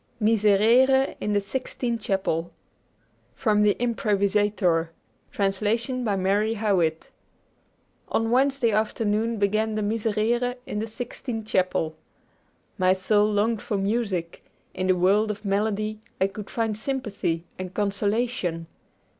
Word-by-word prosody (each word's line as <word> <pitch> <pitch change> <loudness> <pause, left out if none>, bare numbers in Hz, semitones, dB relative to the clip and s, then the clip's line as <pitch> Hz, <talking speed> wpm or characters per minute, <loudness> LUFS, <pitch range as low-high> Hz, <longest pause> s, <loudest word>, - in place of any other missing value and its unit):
'MISERERE' 225 +5 +4
IN 210 - -1
THE 205 - +3
SIXTINE 235 +2 -3
CHAPEL 190 -5 -1 0.8
From 215 -4 +2
'The 210 -1 +4
Improvisatore': 200 -6 +1 0.4
Translation 220 +6 0
by 210 -4 0
Mary 200 +4 +1
Howitt 185 -7 0 1.0
On 225 0 0
Wednesday 265 -2 +3
afternoon 220 +1 0
began 215 +2 +1
the 215 - -1
Miserere 225 +3 0
in 210 - -4
the 220 - -3
Sixtine 225 0 -5
Chapel. 180 -6 0 0.8
My 185 0 +4
soul 205 +3 +2
longed 215 +2 +1
for 205 - -2
music; 195 -4 -2 0.3
in 185 - -2
the 185 - +4
world 200 +5 +3
of 210 0 -5
melody 215 +1 -1 0.2
I 190 - +4
could 195 +1 -6
find 225 -2 -1
sympathy 215 -9 -2 0.2
and 185 -1 -5
consolation. 205 -3 -1
210 Hz, 120 wpm, -25 LUFS, 195-225 Hz, 1.0 s, MISERERE